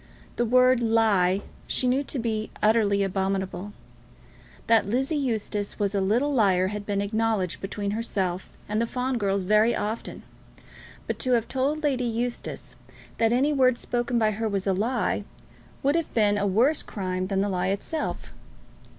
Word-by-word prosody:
The 240 - +1
word 255 +1 +4
"lie" 210 -5 +3 0.3
she - - 0
knew 260 +3 +2
to 275 - -5
be 220 -3 -2
utterly 210 -2 +3
abominable. 190 0 -2 0.9
That 225 -3 +3
Lizzie 265 +7 0
Eustace 220 -7 -2
was 205 -1 0
a 200 - +1
little 240 +10 +1
liar 190 -6 +3
had 210 0 -6
been 200 -1 0
acknowledged 215 -3 -1
between 200 +1 -3
herself 190 -5 -2 0.2
and 210 +2 0
the 235 - 0
Fawn 250 +1 -2
girls 195 -2 0
very 215 +4 +3
often, 215 +2 -4 0.8
but - - -3
to 255 - +1
have 230 -2 +2
told 285 +4 -1
Lady 260 -4 +1
Eustace 240 +1 -4 0.4
that 225 0 +3
any 270 +5 +2
word 255 -3 +3
spoken 240 0 -1
by 220 -2 +3
her 220 +1 -2
was 195 -2 -2
a 195 - +2
lie, 220 +2 0 0.6
would 280 +1 +3
have 335 -1 -1
been 210 -2 +3
a 205 0 0
worse 245 +11 +3
crime 185 -2 -3
than 195 0 0
the 200 - +1
lie 180 -1 -1
itself. 200 +11 -3
220 Hz, 165 wpm, -26 LUFS, 200-245 Hz, 0.9 s, word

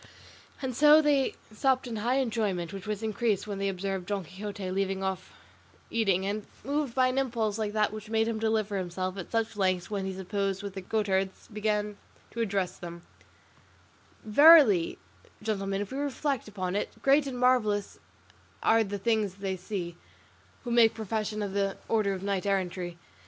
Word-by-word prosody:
And 255 -2 -2
so 300 +3 +7
they 290 -3 +2 0.2
supped 260 +4 +2
in 235 -3 -4
high 235 +5 +1
enjoyment, 215 -9 -1
which 195 +1 -7
was 210 0 -3
increased 215 -2 0
when 200 -2 -5
they 195 0 0
observed 190 -1 -3
Don 200 -2 -2
Quixote 190 +2 -6
leave 195 0 -1
off 190 -1 -3 0.6
eating, 195 -5 +2
and, 205 +1 -3 0.2
moved 280 0 -1
by 260 -1 +4
an 255 +1 0
impulse 225 -5 -1
like 210 -1 -2
that 215 -1 +1
which 215 0 -8
made 225 0 +2
him 225 -1 -2
deliver 215 -2 0
himself 185 +1 -3
at 185 - -6
such 225 -1 0
length 185 -2 0
when 200 -2 -2
he 190 - -3
supped 195 +1 -2
with 200 -1 -5
the 195 - -6
goatherds, 190 -1 -1
begin 210 -1 -1 0.3
to 235 - -3
address 195 -4 -1
them: 170 0 -8 1.2
"Verily, 230 - +7 0.5
gentlemen, 195 -2 -1
if 205 - -5
we 270 - -3
reflect 285 -3 -2
upon 185 -3 -3
it, 205 +1 -3
great 280 +1 +4
and 255 -2 -4
marvellous 230 -5 +2 0.6
are 225 0 +5
the 205 -1 -4
things 215 -2 0
they 195 -1 -3
see, 180 -2 -5 0.7
who 240 - -4
make 235 -2 +5
profession 215 -1 -2
of 200 -1 -4
the 195 -1 0
order 215 -3 +1
of 190 0 -6
knight 200 0 -1
errantry. 180 -3 -1
205 Hz, 175 wpm, -29 LUFS, 195-225 Hz, 1.2 s, so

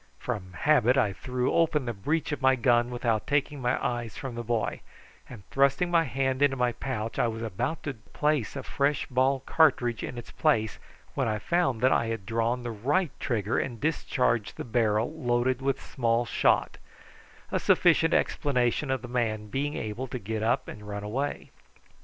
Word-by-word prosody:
From 100 -7 -5
habit 130 +2 +3
I 110 -7 +2
threw 125 +4 -2
open 155 -4 +2
the 120 - -2
breech 150 +12 -1
of 145 - -3
my 130 0 +5
gun 120 -1 +3
without 120 -3 -1
taking 145 0 0
my 125 +1 +1
eyes 120 -3 -3
from 135 -3 -5
the 120 - -4
boy, 115 -1 -1 0.5
and, 110 -7 -11
thrusting 140 +6 +2
my 165 -1 +4
hand 130 +1 -1
into 140 -2 +3
my 125 -1 +2
pouch, 115 -3 -4
I - - +3
was 115 0 -4
about 115 - -3
to 145 - -3
place 140 +3 -1
a 135 - -4
fresh 140 0 0
ball 130 +1 +1
cartridge 130 -6 +2
in 125 - -5
its 120 - -8
place 110 -1 +1 0.3
when - - 0
I 110 -1 0
found 130 - 0
that 130 +1 +4
I 115 - +2
had 115 -3 -4
drawn 115 +2 0
the 120 - -3
right 140 - 0
trigger 110 -3 0
and 120 -3 -4
discharged 125 -7 0
the - - -4
barrel 115 +1 +1
loaded 125 -3 0
with 135 0 0
small 120 -1 0
shot, - - +1 0.7
a - - +1
sufficient - - +4
explanation 130 0 +1
of 130 -2 -1
the - - -6
man 110 -3 -1
being 145 +5 -2
able 110 +5 -4
to 125 - -4
get 110 -1 -4
up 110 +2 +1
and 105 0 -9
run 105 0 -5
away. 130 +8 -3
125 Hz, 185 wpm, -28 LUFS, 115-135 Hz, 0.7 s, my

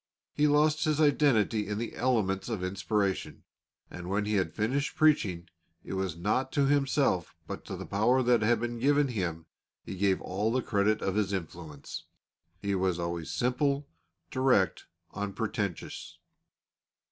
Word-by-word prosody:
He 150 - +3
lost 150 +2 +3
his 155 -1 +1
identity 125 -8 +3
in 105 0 -2
the 115 +1 -4
elements 110 -6 0
of 105 -6 -3
inspiration, 95 +1 -1 0.4
and 90 0 -8
when 100 +2 0
he 105 - -1
had 95 -5 0
finished 130 +7 -1
preaching 110 - +2 0.4
it - - -6
was 95 -3 -2
not 110 +9 0
to 140 -2 +3
himself 135 - +1
but - - -7
to - - -5
the - - -6
power 120 +6 +2
that 120 -2 +3
had 115 +1 +3
been 120 0 -3
given 145 +2 +3
him, 85 -8 -3 0.4
he - - -7
gave 95 0 +2
all 105 +5 -1
the 130 0 0
credit 105 +1 +1
of 95 - 0
his 100 -1 0
influence. 80 -5 -6 0.6
He 100 0 0
was 95 -2 +1
always 85 -1 -3
simple, 140 +3 0 0.4
direct, 130 -9 +2 0.3
unpretentious. 100 -2 -4
105 Hz, 150 wpm, -29 LUFS, 95-130 Hz, 0.6 s, He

